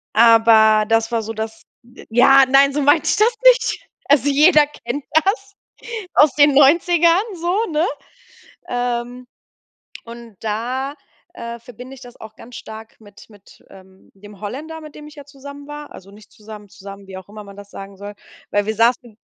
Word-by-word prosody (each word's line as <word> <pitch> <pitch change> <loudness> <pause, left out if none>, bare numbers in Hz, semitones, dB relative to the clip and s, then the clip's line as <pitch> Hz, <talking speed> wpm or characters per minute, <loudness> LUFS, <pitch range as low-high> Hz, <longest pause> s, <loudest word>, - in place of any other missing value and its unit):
Aber 220 -2 +5
das 225 +1 0
war 230 -1 -1
so 225 +1 -6
das 220 0 -7 0.2
d 240 +1 -17
ja, 270 +3 +5
nein, 275 +1 +4
so 295 - -1
meinte 290 +2 +2
ich - - 0
das 450 +2 +2
nicht. - - +3 0.3
Also, 290 0 +3
jeder 300 +1 +4
kennt 285 -1 -7
das 395 +5 0 0.6
aus 295 -1 +4
den 290 -1 +4
Neunzigern 335 +5 +4
so, 360 +7 -2
ne? 310 +3 0 0.8
Ähm, 245 0 -4 0.8
und 235 -2 -13
da, 250 +6 -4 0.4
äh, 235 0 -8
verbinde 250 +3 -13
ich - - -17
das 245 -1 -14
auch 220 0 -12
ganz 240 0 -14
stark 220 +1 -12
mit 205 -2 -18
mit, 205 -2 -20
ähm, 190 0 -19
dem 205 0 -16
Holländer, 310 +9 -8
mit 305 -1 -13
dem 300 0 -12
ich 305 - -15
ja 285 - -11
zusammen 285 0 -13
war. 295 0 -10
Also, 195 +1 -14
nicht 205 0 -18
zusammen 210 -1 -13
zusammen, 195 0 -13
wie 190 - -10
auch 190 +1 -13
immer 210 0 -11
man 200 - -14
das 205 0 -13
sagen 195 0 -11
soll. 205 +1 -9 0.4
Weil 205 0 0
wir 220 0 -3
saßen 235 -1 0
240 Hz, 175 wpm, -18 LUFS, 215-290 Hz, 0.8 s, Aber